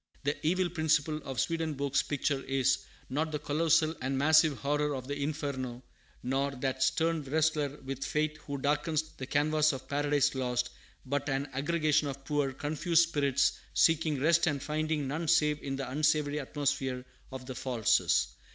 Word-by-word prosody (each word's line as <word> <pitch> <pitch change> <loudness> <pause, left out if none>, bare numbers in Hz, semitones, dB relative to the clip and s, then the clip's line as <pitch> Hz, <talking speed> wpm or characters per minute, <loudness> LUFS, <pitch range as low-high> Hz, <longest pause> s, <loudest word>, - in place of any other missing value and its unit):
The 145 +1 0
evil 180 +3 +2
principle 160 -2 +1
in 135 -3 -7
Swedenborg's 150 -4 0
picture 140 -1 -1
is, 135 -1 +1 0.2
not 155 +4 -1
the 150 - -1
colossal 160 +2 +2
and 135 +1 -1
massive 155 0 +4
horror 150 +1 0
of 130 -1 -6
the 145 - -3
Inferno, 140 -4 -3 0.4
nor 135 +2 0
that 130 0 -2
stern 165 -1 +2
wrestler 150 0 0
with 135 0 -4
fate 155 0 -1
who 140 -2 -6
darkens 150 +3 0
the 130 - -6
canvas 155 +2 +2
of 130 - -7
Paradise 145 0 +1
Lost, 125 -2 -1 0.3
but 140 +2 -2
an 135 +1 -1
aggregation 155 +1 +1
of 135 -1 -7
poor, 145 -2 0
confused 160 +4 +1
spirits, 140 -4 +1 0.2
seeking 160 -3 +3
rest 165 +4 +3
and 145 -4 -1
finding 155 -1 -1
none 160 +4 -3
save 150 -2 +3
in 135 -1 -3
the 135 0 -4
unsavory 150 +1 +1
atmosphere 135 -3 -2 0.3
of 130 -1 -7
the 130 - -6
"falses." 125 -4 +1
145 Hz, 160 wpm, -30 LUFS, 135-155 Hz, 0.4 s, massive